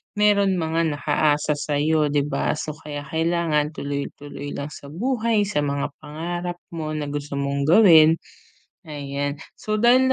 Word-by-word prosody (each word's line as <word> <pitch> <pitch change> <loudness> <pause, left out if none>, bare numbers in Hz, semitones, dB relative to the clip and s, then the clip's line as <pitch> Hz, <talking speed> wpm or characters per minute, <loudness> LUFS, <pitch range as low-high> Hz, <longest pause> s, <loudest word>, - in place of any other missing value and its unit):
meron 200 -2 +3
mga 165 -1 0
nakaasa 150 +1 +1
sa'yo, 150 +1 +1
'di 145 0 +1
ba? - - 0
So 155 - -4
kaya 145 -2 -6
kailangan 160 0 0
tuloy-tuloy 145 0 -5
lang 140 +1 -5
sa 140 - -10
buhay, 225 - 0
sa 205 -4 -1
mga 140 -1 -1
pangarap 175 +4 -4 0.2
mo 155 -2 -4
na 145 -1 -3
gusto 145 0 -4
mong 140 0 -1
gawin, 165 -4 +7 0.7
ayan. 145 -1 -4 0.2
So 215 0 -2
dahil 255 +3 +5
155 Hz, 140 wpm, -23 LUFS, 145-175 Hz, 0.7 s, gawin